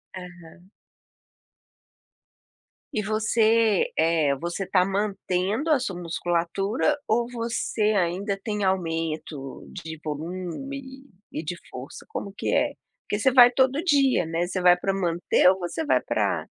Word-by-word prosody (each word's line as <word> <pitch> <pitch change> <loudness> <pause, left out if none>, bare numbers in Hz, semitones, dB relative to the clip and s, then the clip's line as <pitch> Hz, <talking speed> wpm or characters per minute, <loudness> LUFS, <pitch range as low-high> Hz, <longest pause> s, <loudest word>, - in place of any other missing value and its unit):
Aham. 175 0 -12 2.2
E 215 - 0
você, 215 0 +2
eh, 160 -3 +3
você 175 +6 -4
está 185 -1 +3
mantendo 200 - -1
a 290 - +4
sua 200 -7 -3
musculatura 175 - -1
ou 235 +2 +2
você 230 -2 -1
ainda 195 +1 0
tem 210 -2 -2
aumento 165 -6 -3
de 160 0 -7
volume 185 - -6 0.3
e - - -4
de 170 +2 -4
força? 130 +2 -9
Como 200 -1 -5
que - - -1
é? - - +2 0.3
Porque 205 - -1
você 260 +5 +3
vai 245 -1 +8
todo 260 +3 +2
dia, 280 - +3
né, 165 +2 -1
você 185 +1 -3
vai 180 0 +7
para 195 +2 -1
manter 175 -1 +2
ou 190 0 +1
você 185 - -3
vai - - +3
para - - -1
190 Hz, 135 wpm, -25 LUFS, 170-225 Hz, 2.2 s, vai